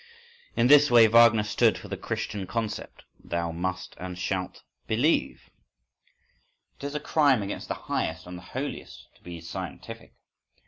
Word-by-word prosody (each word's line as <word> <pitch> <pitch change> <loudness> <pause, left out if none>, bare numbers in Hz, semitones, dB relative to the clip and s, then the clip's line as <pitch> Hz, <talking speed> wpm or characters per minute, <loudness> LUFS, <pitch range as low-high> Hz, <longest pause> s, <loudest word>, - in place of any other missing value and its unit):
In 115 - +2
this 145 +2 +7
way 120 -2 +8
Wagner 115 -1 +6
stood 105 - +2
for - - -10
the - - -4
Christian 100 -3 -4
concept, 110 +2 -4 0.2
"Thou 85 0 -2
must 95 +3 -4
and 90 0 -6
shalt 95 -1 -3 0.2
believe". 125 +9 0 1.3
It - - -7
is 145 +1 -5
a - - 0
crime 140 -7 +2
against 100 - -5
the - - -3
highest 80 0 -2
and 90 0 -8
the 90 - -9
holiest 140 +2 -6
to - - -30
be 85 -1 -8
scientific. 80 - -8
105 Hz, 150 wpm, -27 LUFS, 90-125 Hz, 1.3 s, way